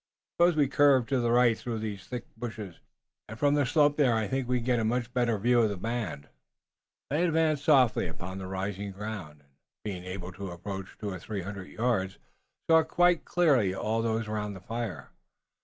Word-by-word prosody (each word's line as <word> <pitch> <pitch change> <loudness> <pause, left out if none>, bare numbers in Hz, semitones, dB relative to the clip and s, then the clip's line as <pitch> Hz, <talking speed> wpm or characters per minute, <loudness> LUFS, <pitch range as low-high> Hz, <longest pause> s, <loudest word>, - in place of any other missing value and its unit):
Suppose 175 -1 +4
we 145 -2 +3
curve 140 -2 +4
to 135 -2 +2
the 120 -1 +1
right 120 -1 +5
through 115 0 -4
these 105 -4 -5
thick 125 -2 -5
bushes, 110 -6 -7 0.5
and 110 - -7
from 145 +4 +3
the 145 -3 +2
slope 145 +1 +3
there 130 -6 +4
I 110 -2 0
think 130 +4 -2
we 125 0 +1
can 120 - -4
get 125 -2 +2
a - - 0
much 120 +2 -1
better 120 -3 +1
view 120 +4 +3
of 110 - +3
the 100 - -4
band." 105 -8 -4 0.8
They 155 +4 +2
advanced 160 -4 +2
softly 130 - +4
upon 90 +3 -7
rising 95 +1 -4
ground, 95 -8 -7
and 70 - -31 0.3
being 95 -4 -5
able 90 0 -6
to 95 +1 -7
approach 95 +2 -7
two 105 -2 -4
or 95 - -6
three 100 +1 -5
hundred 95 0 -7
yards, 110 -5 -1 0.5
saw 160 0 +6
quite 175 +1 +2
clearly 135 - +3
all 110 +3 -1
those 115 -1 -1
around 105 -1 -3
the - - -8
fire. 110 - -5
110 Hz, 195 wpm, -29 LUFS, 95-125 Hz, 0.8 s, saw